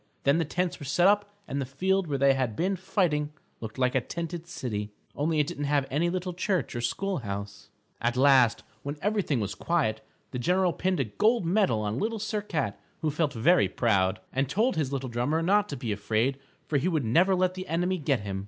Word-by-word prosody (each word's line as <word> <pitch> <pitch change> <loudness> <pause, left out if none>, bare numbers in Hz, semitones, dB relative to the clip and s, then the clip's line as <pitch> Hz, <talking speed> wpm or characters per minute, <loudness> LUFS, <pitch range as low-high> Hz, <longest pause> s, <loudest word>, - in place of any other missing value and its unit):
Then 140 +4 +3
the 165 - +1
tents 180 +3 -2
were 145 - -7
set 145 +6 +2
up 205 0 +3 0.2
and 140 +1 -2
the - - 0
field 190 +7 0
where 145 -2 -1
they 135 0 +5
had 130 -5 -1
been 185 - 0
fighting 165 -5 0 0.3
looked 110 -2 -7
like 125 -1 +2
a 130 - +2
tented 170 +3 -5
city, 105 -10 -4 0.2
only 155 +2 0
it 150 - +3
didn't 145 -2 -4
have 140 -1 +2
any 160 +5 +1
little 180 0 -3
church 185 -4 -1
or 120 - -2
school 190 +10 -1
house. 100 -3 -6 0.3
At 120 +1 0
last, 130 -3 +5 0.2
when 145 +2 -5
everything 200 - 0
was 105 -2 -2
quiet, 135 -11 0 0.3
the 125 - -3
general 180 +6 +2
pinned 185 -3 0
a - - +3
gold 210 - +1
medal 170 - +2
on 105 +3 -2
Little 225 +1 -1
Sir 215 0 -2
Cat, 155 - -2 0.2
who 155 - +1
felt 150 -1 0
very 160 +10 +4
proud, 95 -5 +1
and 135 0 0
told 225 - +1
his 145 -4 -1
little 135 -1 -2
drummer 125 +7 0
not 205 +4 +3
to 140 - -4
be 120 -3 -3
afraid 110 +6 0 0.3
for 150 - 0
he 155 - 0
would 155 -8 0
never 180 - +4
let 185 0 +1
the 185 0 -7
enemy 175 +3 0
get 140 -5 +1
him. 100 -1 -4
150 Hz, 220 wpm, -28 LUFS, 125-180 Hz, 0.3 s, they